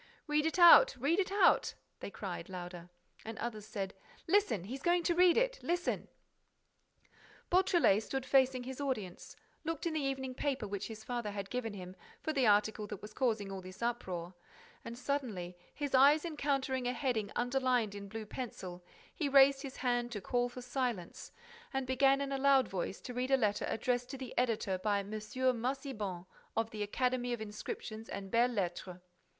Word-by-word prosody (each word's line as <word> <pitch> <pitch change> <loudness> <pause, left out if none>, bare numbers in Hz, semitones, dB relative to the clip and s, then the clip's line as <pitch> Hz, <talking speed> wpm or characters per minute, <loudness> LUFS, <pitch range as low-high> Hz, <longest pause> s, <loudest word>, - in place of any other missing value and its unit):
"Read 300 0 +2
it 320 - -2
out! 360 +8 +9
Read 290 +9 +1
it 385 -1 0
out!" 400 0 +4 0.2
they - - -6
cried, - - -6
louder. 175 -1 -7 0.3
And 225 0 -7
others 215 -3 -5
said: 195 -2 -4 0.3
"Listen! 375 - +2
He's 255 +8 -6
going 345 +1 +2
to 345 - +2
read 355 0 +5
it! - - +1
Listen!" 350 +1 -1 1.4
Beautrelet 350 - +4
stood 265 +3 -4
facing 260 -1 +3
his 265 +2 -6
audience, 215 -10 -4 0.3
looked 330 -1 -3
in 335 - 0
the 315 - 0
evening 265 -1 -2
paper 265 -4 -2
which 200 0 -4
his 220 -1 -9
father 240 -2 -3
had 200 -1 -5
given 230 -4 -3
him 185 -1 -8 0.2
for 315 - -2
the 265 -5 +3
article 210 +1 +3
that 205 -1 -8
was 215 0 -9
causing 220 -6 0
all 190 -1 -5
this 185 +4 -9
uproar 185 -7 -3 0.5
and, 235 0 -7
suddenly, 235 -11 -3 0.2
his 290 -2 -4
eyes 285 +5 +6
encountering 275 -5 -1
a 250 - 0
heading 235 -6 -1
underlined 245 -3 +1
in 200 0 -7
blue 220 +1 -6
pencil, 190 -6 -7 0.3
he 300 -6 -1
raised 275 0 +6
his 275 -2 -7
hand 245 -1 0
to 210 - -3
call 245 +5 0
for 250 0 -9
silence 245 -8 -3 0.4
and 270 -1 -1
began 270 +2 +3
in 280 0 -3
a 275 - -1
loud 275 -1 +5
voice 190 0 -4
to 250 - -7
read 250 +1 -2
a 270 - +5
letter 210 -4 +1
addressed 245 +1 -1
to 270 - -6
the 260 -1 -8
editor 225 -6 0
by 205 +1 +1
M. 200 +1 -9
Massiban, 235 -3 -2 0.3
of 225 0 0
the 215 - -6
Academy 245 +3 0
of 240 - -3
Inscriptions 215 +1 -6
and 195 -1 -6
Belles 240 +2 +3
Lettres. 180 -2 -3
245 Hz, 180 wpm, -33 LUFS, 210-275 Hz, 1.4 s, out